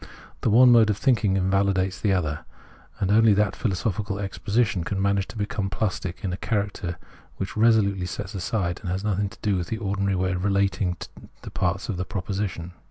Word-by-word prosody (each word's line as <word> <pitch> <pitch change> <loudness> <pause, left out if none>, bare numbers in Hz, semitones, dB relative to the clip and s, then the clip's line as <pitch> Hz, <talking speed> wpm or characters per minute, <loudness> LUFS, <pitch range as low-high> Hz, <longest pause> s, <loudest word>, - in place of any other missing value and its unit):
The - - +1
one 125 +3 +7
mode 115 -2 +6
of 105 - +1
thinking 105 -5 +2
invalidates 95 0 +1
the 105 - +2
other; 80 -6 -1 0.6
and 95 - 0
only 110 0 +6
that 105 0 +1
philosophical 100 0 -2
exposition 100 0 0
can 95 +3 -3
manage 100 0 +1
to - - -10
become 105 -1 -2
plastic 95 -3 -3
in 90 -2 -1
character 100 -5 -2 0.4
which 95 - -4
resolutely 105 -5 +3
sets 95 +3 -6
aside 95 -2 -2
and 95 - -5
has 95 +2 -2
nothing 100 -1 0
to 115 - -15
do 105 -4 +2
with 85 -1 -3
the 110 - -3
ordinary 100 -2 -1
way 95 0 0
of 90 -1 -2
relating 100 -2 +1 0.5
the - - -8
parts 95 +1 -1
of 95 -6 -3
a - - 0
proposition. 95 -2 -4
100 Hz, 185 wpm, -25 LUFS, 95-105 Hz, 0.6 s, one